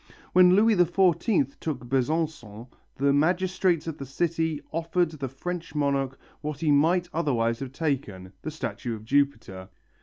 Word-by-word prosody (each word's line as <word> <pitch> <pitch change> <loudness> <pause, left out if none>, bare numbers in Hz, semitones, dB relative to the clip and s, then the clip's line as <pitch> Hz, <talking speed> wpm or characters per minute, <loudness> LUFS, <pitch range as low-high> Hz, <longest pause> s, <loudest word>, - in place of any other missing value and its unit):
When 180 0 +7
Louis 220 +2 +4
XIV 175 - +2
took 140 -6 -4
Besançon, 130 -4 -2 0.3
the 140 +1 +2
magistrates 180 +2 +1
of 160 -2 -5
the 140 - -5
city 160 +2 -1
offered 165 +1 0
the 140 -4 -5
French 165 +4 -6
monarch 140 -2 0 0.2
what 150 -2 -4
he 155 -2 +2
might 165 +5 +3
otherwise 120 -8 0
have 135 -2 -6
taken, 125 - -3
the - - -4
statue 140 -6 -4
of 110 0 -11
Jupiter. 115 -9 0
150 Hz, 145 wpm, -26 LUFS, 135-170 Hz, 0.3 s, When